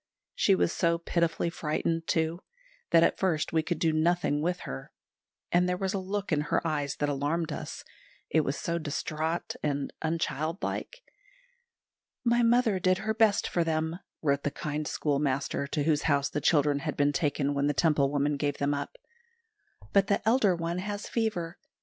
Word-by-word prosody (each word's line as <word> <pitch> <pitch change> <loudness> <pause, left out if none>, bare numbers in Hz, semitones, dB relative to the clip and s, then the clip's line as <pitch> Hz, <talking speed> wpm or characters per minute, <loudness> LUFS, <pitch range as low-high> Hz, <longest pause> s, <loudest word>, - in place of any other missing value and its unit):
She 195 - +3
was 175 - +1
so 170 -1 +2
pitifully 170 0 0
frightened, 165 +1 -2
too, 160 +1 0 0.5
that 165 -1 +6
at - - +2
first 165 -6 0
we 160 - +3
could 175 +1 -2
do 160 -1 +1
nothing 155 -2 +1
with 175 +2 -1
her; 65 0 -7 0.6
and 180 +1 +3
there 180 - 0
was 190 0 -1
a 195 - 0
look 195 +1 -3
in 150 -2 +2
her 150 +2 -1
eyes 145 -3 -1
that 145 - -1
alarmed 150 +3 -1
us, - - -6 0.4
it 160 - +3
was 140 -1 -2
so 170 0 -2
distraught 155 +2 -3
and 145 -2 -2
unchildlike. 165 - -2 1.2
"My 240 0 +3
mother 235 -4 +3
did 185 0 +3
her 220 +2 -1
best 220 -2 +3
for 170 - +1
them," 160 +1 -1 0.2
wrote 140 -2 +2
the 145 - 0
kind 150 +1 -4
schoolmaster 140 -2 -1
to 150 0 -1
whose 150 -1 +2
house 140 -1 +2
the 150 - -2
children 145 -2 +3
had 155 0 -4
been 145 0 +3
taken 145 -2 0
when 140 0 +1
the 145 - +2
Temple 150 -4 +3
woman 145 0 0
gave 145 0 -1
them 140 +1 +1
up; 140 0 -4 1.0
"but 195 -1 +4
the 200 +1 0
elder 220 -6 +4
one 170 +1 -2
has 205 +2 -4
fever. 205 -7 -2
160 Hz, 175 wpm, -29 LUFS, 145-180 Hz, 1.2 s, that